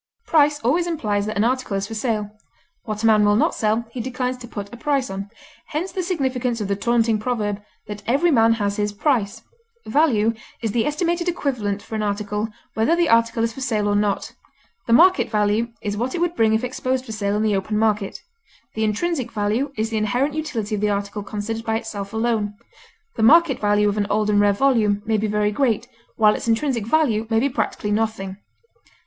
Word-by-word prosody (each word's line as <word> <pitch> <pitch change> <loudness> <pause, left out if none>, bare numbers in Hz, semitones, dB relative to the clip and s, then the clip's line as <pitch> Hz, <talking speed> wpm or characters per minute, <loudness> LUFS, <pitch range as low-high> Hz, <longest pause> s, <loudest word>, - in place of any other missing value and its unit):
Price 295 -4 +3
always 325 +9 +1
implies 210 -11 -1
that 215 0 -3
an 205 - +3
article 250 -4 0
is 195 - -2
for 225 - -7
sale; 215 -2 -2 0.5
what 215 -1 -4
a - - +2
man 215 -2 +5
will 205 0 +4
not 300 +9 +2
sell 220 +1 0
he 240 - -4
declines 255 +1 -2
to 245 -1 -10
put 205 -2 -7
a - - -5
price 270 -2 -1
on; 195 +1 -5 0.4
hence 330 +6 -3
the 375 - -2
significance 260 -9 -1
of 210 - -2
the 200 - 0
taunting 230 0 +1
proverb 210 -3 -2 0.2
that 210 0 -7
"every 290 +8 +3
man 230 -4 +5
has 205 -3 -1
his 210 0 0
price." 225 -2 0 0.4
Value 230 -5 +2 0.3
is 225 -3 -2
the 225 +3 +1
estimated 345 +3 0
equivalent 225 - -2
for - - -11
an 215 - -1
article, 210 +1 -2 0.3
whether 225 +10 +2
the 345 -1 +2
article 230 0 +3
is 230 0 -1
for 270 - -9
sale 215 -6 0
or 205 - +1
not; 205 -1 0 0.5
the - - -1
market 360 +5 +5
value 210 +1 +1 0.2
is 205 -1 -2
what 245 +5 -2
it - - -2
would 345 0 0
bring 220 -1 +3
if 220 +2 +1
exposed 255 +1 -2
for 225 - -8
sale 205 -2 -1
in 210 - 0
the 215 -2 +2
open 195 +2 -1
market; 210 -2 0 0.5
the 220 - -2
intrinsic 250 +4 -1
value 220 +6 -1
is 220 +1 -1
the 220 - -1
inherent 245 +7 0
utility 250 -9 -3
of 205 - -1
the 210 - +2
article 200 +1 -2
considered 215 +2 -4
by 225 -1 -1
itself 200 -3 -5
alone; 220 -2 -1 0.6
the - - -1
market 270 +4 +5
value 205 0 +2
of 205 0 0
an 205 -1 0
old 210 0 +1
and 205 - +3
rare 205 0 +4
volume 210 -3 +2
may 220 -1 +1
be 215 - 0
very 210 0 +1
great, 235 -1 0 0.3
while 215 -1 +5
its - - -5
intrinsic 230 -1 0
value 230 -6 +2
may 225 -1 +3
be 270 - +2
practically 220 -4 -2
nothing. 205 -3 -1
225 Hz, 210 wpm, -22 LUFS, 210-255 Hz, 0.6 s, man